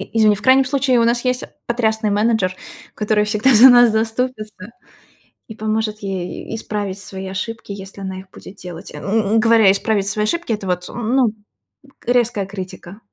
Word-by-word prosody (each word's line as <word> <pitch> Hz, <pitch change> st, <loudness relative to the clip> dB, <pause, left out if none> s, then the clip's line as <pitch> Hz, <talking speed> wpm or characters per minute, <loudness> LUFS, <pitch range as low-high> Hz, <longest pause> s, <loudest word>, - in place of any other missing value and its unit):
И -, -, -8 dB
извини, 215 Hz, -2 st, +4 dB
в 210 Hz, -, -10 dB
крайнем 260 Hz, +3 st, +5 dB
случае, 260 Hz, -2 st, +1 dB
у -, -, +3 dB
нас 240 Hz, +2 st, +1 dB
есть 250 Hz, 0 st, 0 dB, 0.2 s
потрясный 220 Hz, -2 st, 0 dB
менеджер, 210 Hz, -3 st, +1 dB, 0.4 s
который 210 Hz, 0 st, +1 dB
всегда 215 Hz, +5 st, +2 dB
за 235 Hz, +4 st, +9 dB
нас 245 Hz, -2 st, +7 dB
заступится 220 Hz, -2 st, -3 dB, 0.8 s
и 220 Hz, -, -8 dB
поможет 215 Hz, 0 st, -2 dB
ей 190 Hz, -3 st, -5 dB
и -, -, -2 dB
исправить 205 Hz, -3 st, -4 dB
свои 190 Hz, -1 st, -8 dB
ошибки, 210 Hz, +4 st, -6 dB
если 195 Hz, 0 st, -10 dB
она 190 Hz, -1 st, -5 dB
их 190 Hz, 0 st, -17 dB
будет 195 Hz, -, -13 dB
делать. 180 Hz, -1 st, -9 dB
Э, -, -, -7 dB
ну, 215 Hz, +1 st, 0 dB
и -, -, +5 dB
говоря 225 Hz, -3 st, +5 dB
"исправить 200 Hz, 0 st, 0 dB
свои 210 Hz, +1 st, 0 dB
ошибки", 340 Hz, +2 st, -2 dB
это 210 Hz, -3 st, -4 dB
вот, 180 Hz, -1 st, -2 dB
ну, 240 Hz, 0 st, 0 dB, 0.7 s
резкая 240 Hz, -4 st, +1 dB
критика. 190 Hz, 0 st, -9 dB
215 Hz, 180 wpm, -19 LUFS, 195-235 Hz, 0.8 s, за